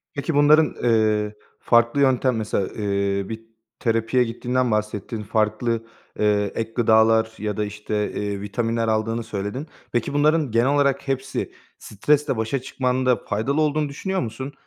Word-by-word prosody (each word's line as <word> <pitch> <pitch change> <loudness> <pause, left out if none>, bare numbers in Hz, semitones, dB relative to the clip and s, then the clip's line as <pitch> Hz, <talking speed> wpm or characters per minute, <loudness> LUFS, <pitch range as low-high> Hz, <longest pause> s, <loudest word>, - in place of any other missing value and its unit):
Peki 145 +2 -2
bunların, 150 +1 +5
eee, 110 -2 +2 0.2
farklı 120 +4 +3
yöntem, 130 -2 +3
mesela, 105 -3 -1
eee, 100 -1 -2
bir 110 0 -5 0.4
terapiye 115 +2 +1
gittiğinden 125 +1 -1
bahsettin, 105 +1 -2
farklı, 110 +2 0 0.3
eee, 105 -1 +2
ek 115 0 -3
gıdalar 110 -1 +4
ya 105 -1 -3
da 105 - 0
işte, 105 0 -3
eee, 100 -1 -3
vitaminler 115 +2 -1
aldığını 115 +1 0
söyledin. 110 +7 -5 0.2
Peki 120 +3 -1
bunların 150 -2 +2
genel 115 +3 +3
olarak 140 -1 +1
hepsi 135 +1 -2 0.3
stresle 140 +5 0
başa 110 +4 -1
çıkmanda 130 -1 +1
faydalı 130 +9 0
olduğunu 150 -1 +1
düşünüyor 190 +7 -3
musun? 130 +4 -5
115 Hz, 140 wpm, -23 LUFS, 105-135 Hz, 0.4 s, bunların